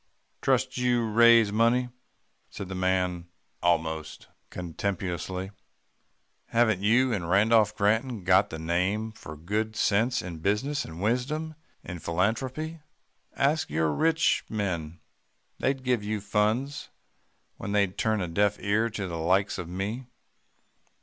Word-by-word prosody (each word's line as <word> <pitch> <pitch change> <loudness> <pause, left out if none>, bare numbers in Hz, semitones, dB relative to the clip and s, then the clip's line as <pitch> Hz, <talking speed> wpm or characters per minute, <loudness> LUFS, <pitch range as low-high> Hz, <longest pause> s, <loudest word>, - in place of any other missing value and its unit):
"'Trust 130 0 +1
you 125 -1 +2
to 110 - -3
raise 115 -2 +6
money,' 115 +3 +2 0.6
said 100 - -7
the - - -4
man 90 -2 0 0.3
almost 80 -2 -1 0.2
contemptuously. 90 +1 -4 1.0
'Haven't 110 -5 +2
you 120 +4 +3
and 90 -5 -3
Rudolph 105 +2 +4
Granton 110 +1 0
got 95 +2 +4
the 80 - -6
name 90 +7 -1
for 80 -8 -10
good 105 +7 -2
sense 115 +4 +1
in 85 -3 -7
business, 105 - 0
and 80 +4 -8
wisdom 145 +8 -1 0.3
in 90 -1 -7
philanthropy 125 - -2 0.6
ask 150 +3 +1
your 80 +1 +1
fellow 75 - -2
rich 165 0 +2
men. 85 -6 -3 0.6
They'd 135 -1 0
give 125 -4 +1
you 105 +1 -2
funds, 110 +8 -1 0.7
when 100 - -5
they'd 100 -2 +1
turn 110 -2 0
a 90 - -2
deaf 100 +4 +1
ear 110 +3 +1
to 105 -3 -4
the 85 -3 -4
likes 95 +4 +1
of 85 -2 -6
me. 105 +8 -4
105 Hz, 135 wpm, -27 LUFS, 90-120 Hz, 1.0 s, raise